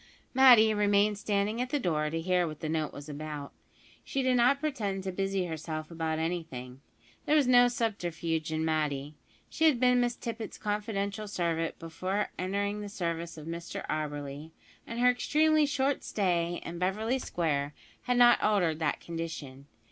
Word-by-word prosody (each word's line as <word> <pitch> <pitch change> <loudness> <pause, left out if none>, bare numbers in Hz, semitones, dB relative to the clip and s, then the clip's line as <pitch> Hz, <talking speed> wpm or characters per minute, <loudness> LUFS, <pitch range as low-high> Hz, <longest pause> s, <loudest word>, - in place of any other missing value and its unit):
Matty 245 -5 +7
remained 205 0 +2
standing 210 +3 0
at 250 - -2
the 290 - +1
door 155 - 0
to 165 +1 -2
hear 180 +1 +1
what 155 -1 -7
the 160 - -4
note 155 -2 -1
was 145 +1 -10
about. 150 -1 -6 0.5
She 270 - -2
did 255 -1 +3
not 250 +3 +4
pretend 210 -11 -2
to 190 - -3
busy 195 0 -1
herself 155 -1 -5
about 160 -1 -2
anything. 160 -7 -4 0.5
There 305 - +4
was 295 -3 +5
no 245 -1 +6
subterfuge 170 -9 -2
in 160 0 -1
Matty. 150 -2 -1 0.3
She 320 - 0
had 295 -7 +4
been 250 0 +4
Miss 240 0 0
Tippet's 230 -1 -6
confidential 210 0 -2
servant 165 -4 -1
before 185 +5 -3
entering 200 +2 -1
the 205 - -6
service 170 -3 -4
of 155 - -9
Mr 170 +1 -6
Auberly, 145 -1 -4 0.4
and 230 - -5
her 250 0 +5
extremely 305 +4 +3
short 280 -1 0
stay 175 -4 0
in 170 0 -6
Beverly 215 +8 0
Square 150 - -1 0.3
had 250 -1 0
not 240 0 +6
altered 180 -7 +2
that 160 -3 -1
condition. 160 -5 -6
185 Hz, 165 wpm, -30 LUFS, 160-225 Hz, 0.5 s, Matty